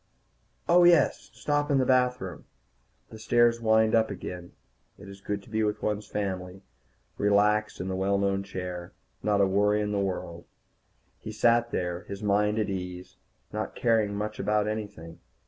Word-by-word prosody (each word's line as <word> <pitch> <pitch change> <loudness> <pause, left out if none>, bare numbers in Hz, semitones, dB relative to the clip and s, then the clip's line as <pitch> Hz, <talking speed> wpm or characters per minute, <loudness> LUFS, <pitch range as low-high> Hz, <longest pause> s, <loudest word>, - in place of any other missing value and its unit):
Oh, 175 +1 +6
yes, 170 -5 +4
stop 145 0 -1
in 140 - +3
the 130 - +2
bathroom. 125 - 0 0.7
The 110 - -10
stairs 115 +1 +3
wind 110 -1 +3
up 110 -1 +3
again. 90 -3 -7 0.4
It 100 - -13
is 100 0 -11
good 100 0 -4
to - - -17
be 110 0 0
with 105 0 -2
one's 105 -1 -2
family, 95 -2 -4 0.6
relaxed 105 +1 +2
in 90 - -4
the 95 - -2
well 95 +1 +1
known 100 0 0
chair. 90 -3 -6 0.3
Not 105 -1 +2
a - - +5
worry 105 +2 +2
in 105 0 -1
the 100 - 0
world. 90 -3 -4 0.7
He 110 - -7
sat 120 +2 +3
there, 90 -3 -3
his 100 +1 -7
mind 105 +1 +2
at 110 - 0
ease, 90 -1 -6 0.4
not - - -4
caring 110 -3 +1
much 105 +1 -4
about 105 +1 +1
anything. 100 -6 -6
105 Hz, 165 wpm, -27 LUFS, 95-110 Hz, 0.7 s, Oh